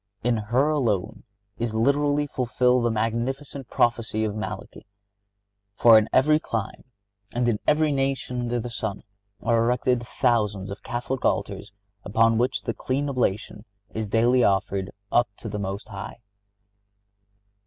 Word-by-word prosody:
In 120 0 +2
her 120 +7 +1
alone 115 -8 -1 0.3
is 115 -1 -2
literally 145 +5 +2
fulfilled 125 -2 +1
the - - +3
magnificent 120 +5 -2
prophecy 115 -2 +1
of 105 -2 -1
Malachy; 110 - -6 0.9
for 115 +1 +7
in 110 0 +5
every 150 +4 +4
clime, 110 -8 -4 0.5
and 120 0 +1
in 110 -3 +1
every 155 0 +3
nation 135 -2 -1
under 120 0 -1
the 120 +1 -5
sun, 110 -4 -4 0.4
are 115 0 +3
erected 125 +1 +1
thousands 105 -5 0
of 100 - -7
Catholic 125 +2 -4
altars - - -1 0.3
upon 115 +2 +3
which 125 +2 0
the 115 - -2
"clean 140 +5 -2
oblation"(68) 105 -5 -1 0.4
is 110 - -2
daily 120 +4 +3
offered 95 -1 +1 0.2
up 120 0 +3
to - - -8
the 105 -1 -4
Most 100 +2 -5
High. 100 0 -7
120 Hz, 140 wpm, -25 LUFS, 110-130 Hz, 0.9 s, for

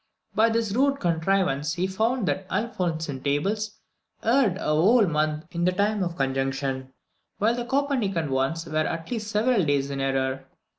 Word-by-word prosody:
By 225 +2 +4
this 225 -2 0
rude 275 +5 +2
contrivance 165 -3 +1
he 180 +1 0
found 220 +3 0
that 190 -1 -2
the - - -2
Alphonsine 165 - -2
Tables 205 +10 -1 0.5
erred 230 -5 +3
a 200 - -3
whole 205 +9 +5
month 155 -1 0
in 170 -1 -2
the 180 - +3
time 205 +2 +1
of 175 -2 -2
conjunction, 135 0 -1 0.5
while 220 +3 +2
the 240 0 -3
Copernican 240 - 0
ones 135 +5 0
were 155 -1 -3
at 165 +3 -2
least 220 -3 -3
several 215 0 +2
days 140 -2 0
in 135 -1 -3
error. 135 0 -1
180 Hz, 165 wpm, -25 LUFS, 145-220 Hz, 0.5 s, whole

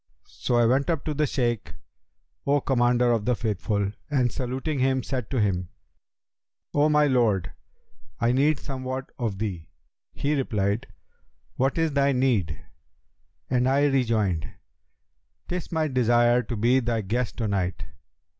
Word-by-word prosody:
So 120 - -3
I 120 -1 +4
went 130 +6 +2
up 165 -4 -1
to 155 - -1
the 150 +1 +1
Shaykh, 120 -4 -2 0.7
O 145 +1 +4
Commander 120 -2 +2
of 115 -3 0
the 125 +1 +2
Faithful, 105 -2 -1 0.2
and 130 -5 +1
saluting 130 +4 -3
him 130 0 +1
said 125 -5 -4
to 130 - -1
him, 90 -4 0 1.0
'O 145 +1 +3
my 150 0 +4
lord, 115 -9 +2 0.7
I 115 +1 +2
need 140 +4 +3
somewhat 130 0 -5
of 110 -5 -2
thee!' 95 -6 -4 0.4
He 145 +2 -1
replied, 110 -6 -1 0.7
'What 135 +4 0
is 165 -1 +1
thy 140 0 +3
need?' 120 -11 0 0.8
and 125 0 +2
I 140 +2 +3
rejoined, 110 - +1 1.0
''Tis 180 -2 -4
my 160 -2 +1
desire 120 -2 +3
to 120 +1 -5
be 120 +5 +3
thy 115 -2 -1
guest 115 +4 -2
to 115 - -1
night.' 90 -6 -1
125 Hz, 145 wpm, -25 LUFS, 110-135 Hz, 1.0 s, I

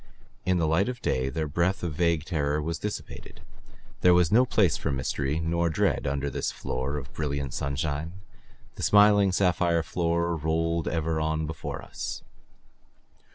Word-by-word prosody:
In 90 -1 +3
the 85 - +1
light 80 +9 +2
of 125 -1 -5
day 65 +1 0
their 80 +4 -2
breath 85 +6 0
of 85 -3 -2
vague 85 -1 +1
terror 75 -4 0
was 80 +2 -3
dissipated. 105 0 -7 0.6
There 90 -1 +6
was 90 -2 +3
no 125 +4 +5
place 100 - +3
for - - -2
mystery 70 +3 -1
nor 85 +1 0
dread 80 - 0
under 70 +1 -1
this - - -2
floor 65 +3 -3
of 70 -2 -8
brilliant 70 -3 -3
sunshine. 70 +3 -2 0.6
The - - -6
smiling 105 -1 +5
sapphire 90 -3 +2
floor 85 0 0
rolled 80 +1 -1
ever 80 -1 -1
on 80 0 -1
before 80 +1 -6
us. - - -6
80 Hz, 155 wpm, -27 LUFS, 75-85 Hz, 0.6 s, There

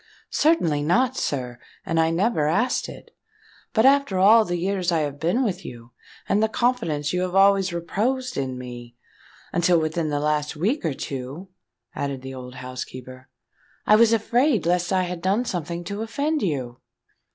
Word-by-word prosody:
"Certainly 175 - +2
not, 245 - +2
sir; 125 - -3 0.3
and 165 -1 0
I 160 0 +3
never 170 -2 +1
asked 220 +11 0
it. - - -13 0.6
But 220 +2 +3
after 275 -7 +4
all 215 +4 +6
the 175 -2 -2
years 185 0 -1
I 165 -2 +2
have 145 -1 -4
been 175 - +1
with 195 -5 -2
you, 120 0 -10 0.4
and 205 - +2
the 220 - +2
confidence 195 - 0
you 180 - 0
have 185 0 -2
always 195 -1 +4
reposed 245 +10 -2
in 130 -2 -3
me—until 125 +7 -3
within 155 0 -1
the 145 -1 -1
last 150 0 -1
week 210 - -1
or 155 -5 -1
two," 135 +9 -6 0.4
added 140 -2 -4
the 135 0 -7
old 125 -1 -9
housekeeper, 130 0 -8 0.6
"I 210 - +6
was 230 +1 +5
afraid 230 - +2
lest 175 +1 +1
I 185 -1 +2
had 180 -1 -5
done 200 +7 +1
something 175 -3 -4
to 200 +4 -5
offend 285 +7 -1
you." 130 -9 -3
175 Hz, 165 wpm, -23 LUFS, 145-215 Hz, 0.6 s, all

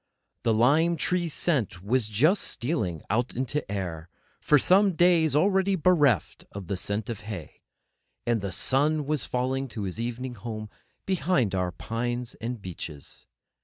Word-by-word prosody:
The 115 - +2
lime 150 +9 +4
tree 175 +1 0
scent 130 - -1
was 115 +2 +1
just 150 - +3
stealing 110 - -2
out 120 +3 0
into 130 -1 -2
air 85 -4 -4 0.3
for 150 - +4
some 190 +6 +4
days 165 -3 +4
already 190 +4 +3
bereft 150 - +2
of 100 -1 -6
the 100 - -2
scent 100 +3 -3
of 115 -2 -5
hay; 105 -7 -8 0.6
and 120 -2 +1
the 100 -1 -3
sun 145 - +1
was 150 -2 -1
falling 130 +2 -1
to 110 -3 -6
his 95 +3 -3
evening 120 +2 -4
home 110 -1 -6 0.3
behind 160 - +1
our 90 -1 0
pines 120 +5 -3
and 120 +1 -3
beeches. 85 -6 -7
120 Hz, 150 wpm, -27 LUFS, 105-155 Hz, 0.6 s, lime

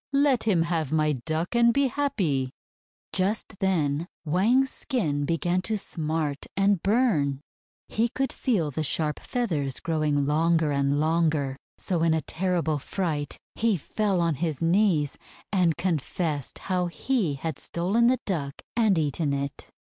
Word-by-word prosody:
Let 275 -4 +3
him 185 -7 +3
have 165 -4 -1
my 155 -1 +2
Duck, 155 - -2
and 235 0 +5
be 275 +3 +2
happy!" 190 - 0 0.6
Just 195 +1 -1
then 165 -4 +1 0.2
Wang's 230 - +3
skin 150 - -1
began 175 +3 0
to 215 +3 -1
smart 155 -6 -3
and 195 -2 +3
burn. 190 - +2 0.5
He 230 +2 +1
could 270 +3 -2
feel 185 - 0
the 150 - -2
sharp 155 0 0
feathers 155 - -1
growing 150 -3 0
longer 160 +1 +2
and 140 0 +1
longer, 155 -3 +1 0.2
so 175 -3 -1
in 165 -1 +3
a 160 - 0
terrible 165 -2 -1
fright 150 -3 -2 0.2
he 220 -3 +1
fell 195 +3 0
on 170 -1 +2
his 160 -5 -1
knees, 165 -4 +2 0.3
and 175 -5 +3
confessed 160 -4 -2
how 180 -1 +2
he 185 - 0
had 145 +1 -4
stolen 200 +8 +1
the 255 +1 +4
Duck 145 -8 -3 0.2
and 220 -6 +3
eaten 150 -1 0
it. 140 0 -5
165 Hz, 145 wpm, -26 LUFS, 150-200 Hz, 0.6 s, and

